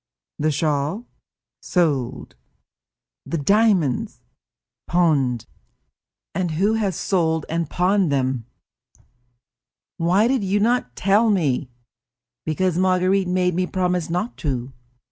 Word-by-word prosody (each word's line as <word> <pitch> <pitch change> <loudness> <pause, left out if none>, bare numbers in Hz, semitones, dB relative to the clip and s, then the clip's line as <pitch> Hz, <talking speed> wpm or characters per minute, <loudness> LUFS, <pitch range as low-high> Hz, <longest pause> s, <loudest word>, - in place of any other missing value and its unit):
"The 155 +1 +1
shawl?" 150 - -1 0.6
"Sold." 145 -9 -1 0.9
"The 170 - -3
diamonds?" 200 - +2 0.7
"Pawned." 145 -9 +1 0.9
"And 180 0 -1
who 195 +7 +2
has 205 -5 0
sold 160 -5 0
and 165 -1 -2
pawned 185 -2 +2
them?" 130 -4 -1 0.5
"I." - - -29 1.0
"Why 180 +6 +3
did 255 -3 +1
you 195 +2 +1
not 225 - 0
tell 205 +4 +3
me?" 145 -10 0 0.8
"Because 175 +2 0
Marguerite 185 +1 +2
made 180 0 +1
me 180 +2 0
promise 180 -3 -1
not 180 +8 -2
to." 130 -3 -3
180 Hz, 105 wpm, -22 LUFS, 150-195 Hz, 1.0 s, Why